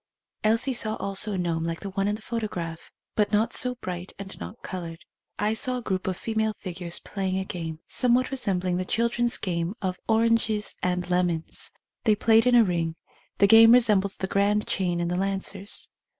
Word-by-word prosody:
Elsie 230 +5 +2
saw 220 -2 0
also 200 +2 0
a - - -2
gnome 170 -2 -1
like 165 0 -3
the 200 - -6
one 195 +1 -1
in 205 - 0
the 215 - -12
photograph, 180 -9 -4 0.2
but 210 -1 +1
not 215 +2 +2
so 250 -1 +3
bright 180 -5 -6
and 195 -1 -9
not 230 - -9
coloured. 170 -3 -7 0.3
I 210 +1 +1
saw 250 +3 -1
a - - -5
group 190 -3 -2
of 185 -1 -1
female 220 -1 -1
figures 175 -2 -4
playing 190 -2 -3
a 190 - -2
game, 165 -3 -6
somewhat 250 +1 +2
resembling 185 -8 0
the 185 - -1
children's 235 +4 +1
game 175 +1 -2
of 185 -2 -3
oranges 225 -1 +2
and 180 -1 -1
lemons. 180 -2 -1 0.3
They 215 -2 +5
played 225 +2 +4
in 250 - +5
a 235 - +7
ring; 170 -4 -1 0.4
the 200 - +5
game 225 +2 +8
resembled 210 -5 +4
the - - -2
grand 200 +2 +1
chain 175 -2 -1
in 170 - -1
the 175 +1 -1
Lan 195 +1 0
cers. 195 +1 -2
195 Hz, 195 wpm, -26 LUFS, 180-225 Hz, 0.4 s, game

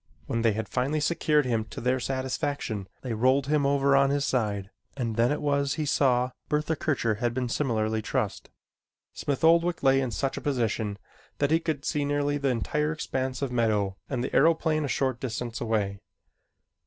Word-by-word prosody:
When 115 - -1
they 115 -2 +3
had 110 +2 -3
finally 140 +5 0
secured 150 -2 +2
him 115 -3 0
to - - -8
their 125 +2 +1
satisfaction, 130 -4 -2 0.2
they 125 -3 -3
rolled 130 +4 +3
him 145 0 +2
over 140 0 +3
on 140 0 +4
his 140 0 +1
side 105 -5 -1 0.3
and 115 -4 -2
then 120 +3 +3
it 150 - -2
was 140 -1 +1
he 155 - -2
saw 125 -3 +2 0.2
Bertha 150 +2 0
Kircher 120 -8 0
had 120 -1 -1
been 130 -1 -1
similarly 110 -4 0
trussed. - - -2 0.6
Smith 140 0 -3
Oldwick 170 +1 +4
lay 135 0 +5
in 130 - -1
such 135 +3 -2
a - - -4
position 115 -6 -1 0.4
that 145 0 +1
he 160 - +4
could 155 -3 -3
see 150 -3 0
nearly 145 0 0
the 140 -1 +1
entire 150 +5 0
expanse 130 -4 -3
of 135 - -2
meadow 105 -5 +1
and 125 -3 -1
the - - -3
aeroplane 160 0 +3
a - - -1
short 130 -2 0
distance 120 -1 -4
away. 105 -4 -1
130 Hz, 185 wpm, -27 LUFS, 115-145 Hz, 0.6 s, lay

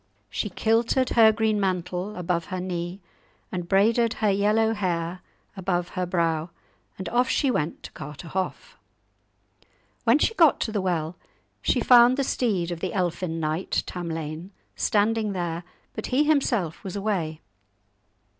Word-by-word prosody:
She 210 - -2
kilted 230 +6 +1
her 225 -2 +7
green 215 -1 +1
mantle 185 +1 -2
above 175 -1 -1
her 185 -2 -4
knee, 180 +1 -4 0.5
and 175 -2 -4
braided 225 +4 +3
her 215 -2 +1
yellow 215 +3 +2
hair 180 -3 -2 0.3
above 180 -2 -1
her 180 -1 -3
brow, 165 -2 0 0.5
and 190 - -5
off 245 +2 +2
she 275 -3 +2
went 155 -7 -2
to - - -9
Carterhaugh. 160 +5 -5 1.3
When 235 +3 +5
she 380 - +1
got 330 -9 +5
to 220 - -1
the 210 -2 -1
well, 170 -2 -1 0.4
she - - +1
found 245 +1 +7
the 275 - +1
steed 195 -10 0
of 170 - -4
the 185 +1 -3
elfin 175 -2 -1
knight 155 +3 -1
Tamlane 165 -1 -5 0.3
standing 215 0 +1
there, 175 -2 -3 0.3
but 220 - -5
he 260 +4 +3
himself 250 - +1
was 190 -1 -6
away. 190 -7 -2
190 Hz, 145 wpm, -25 LUFS, 170-220 Hz, 1.3 s, her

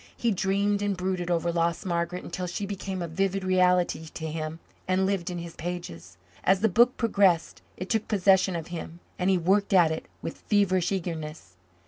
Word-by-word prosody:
He 235 - +1
dreamed 200 +1 +1
and 205 -2 -1
brooded 185 -1 -2
over 170 0 +1
lost 170 +3 0
Margaret 175 0 -2
until 180 -1 -4
she 190 +4 -3
became 195 -2 -4
a - - -3
vivid 195 +3 -1
reality 180 -3 +2
to 160 - -5
him 155 0 -4 0.3
and 185 +1 +2
lived 190 -3 -1
in 175 - -4
his 170 -1 -7
pages. 155 - -6 0.3
As 190 0 +3
the 220 - +4
book 240 +7 +4
progressed 200 -7 +2 0.2
it 185 - -5
took 220 0 0
possession 190 -2 +3
of 165 0 -5
him 170 0 -7 0.2
and 180 +1 +1
he 190 - +4
worked 195 +4 +2
at 175 -4 +6
it 160 - -4 0.2
with - - -5
feverish 190 -4 +2
eagerness. 160 - -5
180 Hz, 185 wpm, -27 LUFS, 170-195 Hz, 0.3 s, at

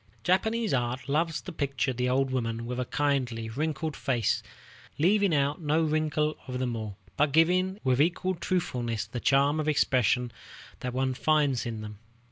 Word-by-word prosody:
Japanese 220 +3 +1
art 125 +1 -1
loves 155 +3 0
to 185 - -8
picture 140 -4 -1
the 125 +1 -1
old 135 +1 +1
woman 115 -2 -2
with 125 +1 -4
her 125 - -1
kindly, 125 -6 -1
wrinkled 150 +4 -2
face, 120 -6 0 0.6
leaving 200 +4 +3
out 145 +1 +1
no 155 +1 +2
wrinkle 155 -1 0
of 125 -1 -3
them 125 -2 -1
all, 110 -3 -5 0.2
but 150 0 +3
giving 180 +5 +3
with 130 0 +3
equal 175 +3 +1
truthfulness 125 - -2
the 115 +3 -5
charm 140 +4 +3
of 155 - -1
expression 125 -4 +2 0.5
that 125 - -3
one 130 0 +1
finds 145 -3 +1
in 110 -2 -4
them. 105 -1 -8
140 Hz, 165 wpm, -28 LUFS, 125-155 Hz, 0.6 s, leaving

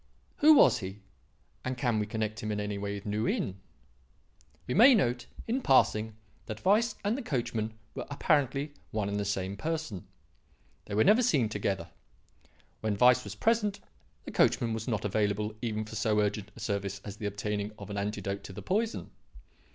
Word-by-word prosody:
Who 310 +1 +8
was - - +6
he? 95 -1 -6 0.7
and 130 0 -3
can 120 -4 +1
we 105 - -1
connect 110 0 -3
him 110 - -3
in 105 - -2
any 105 -1 -3
way 100 0 -3
with 100 - -8
New 105 +2 -1
Inn? 95 0 -1 1.1
"We 125 - -2
may 250 +5 +8
note 120 - 0 0.2
in 250 +4 0
passing 110 - +3 0.3
that 110 0 -7
Weiss 215 +4 +3
and 210 +3 +2
the 275 - -3
coachman 115 - -2 0.2
were - - -6
apparently 145 0 +1 0.2
one 105 -2 -2
and 100 0 -1
the 100 - -1
same 95 -1 -2
person. 155 - -4 0.8
They 100 - -5
were 110 - +5
never 220 +4 +6
seen 145 - +2
together. 100 -5 -2 0.9
When 110 -2 -1
Weiss 125 +2 +6
was 100 0 -7
present, 210 - +1 0.4
the - - -7
coachman 115 -2 +2
was 110 0 -4
not 110 -4 -1
available 105 +1 0
even 110 -2 -2
for 110 - -9
so 105 0 +1
urgent 105 -1 -1
a - - -12
service 100 -3 -2
as 105 0 -7
the 105 - -3
obtaining 105 0 -3
of 100 0 -9
an 100 - -4
antidote 100 -1 -3
to 95 - -8
the - - -8
poison. 220 +4 -1
110 Hz, 180 wpm, -30 LUFS, 100-135 Hz, 1.1 s, Who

